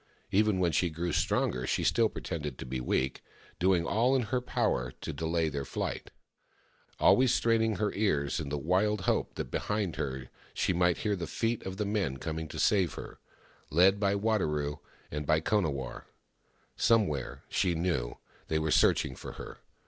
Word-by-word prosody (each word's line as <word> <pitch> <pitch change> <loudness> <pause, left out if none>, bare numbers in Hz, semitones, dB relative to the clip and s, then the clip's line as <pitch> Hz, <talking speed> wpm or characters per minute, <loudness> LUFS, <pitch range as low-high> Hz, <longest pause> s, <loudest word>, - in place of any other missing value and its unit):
Even 105 0 +3
when 90 -2 +2
she 90 +2 +2
grew 85 +2 -3
stronger 60 -4 0
she - - 0
still 115 -2 +3
pretended 75 -6 -5
to - - -7
be 65 0 -4
weak, 65 +1 -1 0.4
doing 90 -1 +3
all 120 +8 +2
in 130 - +2
her 125 +3 -1
power 60 - -1
to - - -5
delay 80 0 0
their 70 -2 -3
flight— - - -4 0.9
always 130 -1 +5
straining 115 -1 +2
her 105 +2 -1
ears 75 -9 0
in 75 -3 -4
the 75 - -2
wild 95 +7 +1
hope - - 0
that - - -5
behind 105 -5 -1
her 65 -1 -3 0.3
she - - +1
might 90 0 +2
hear 105 -1 0
the 90 -3 -4
feet 115 0 -1
of 95 0 -5
the 105 - -1
men 100 -10 -1
coming 80 +2 -4
to - - -8
save 95 -5 +2
her - - -9 0.3
— - - -31
led 95 +2 +6
by 100 -1 +2
Wadaro 75 -9 0 0.3
and 75 0 -4
by 80 - +4
Konawarr. 80 - -1 0.7
Somewhere, 95 - +1
she 90 -3 +1
knew, 80 -9 -1 0.3
they 80 - 0
were 80 0 0
searching 65 - +3
for - - -8
her. - - -9
90 Hz, 175 wpm, -30 LUFS, 75-105 Hz, 0.9 s, led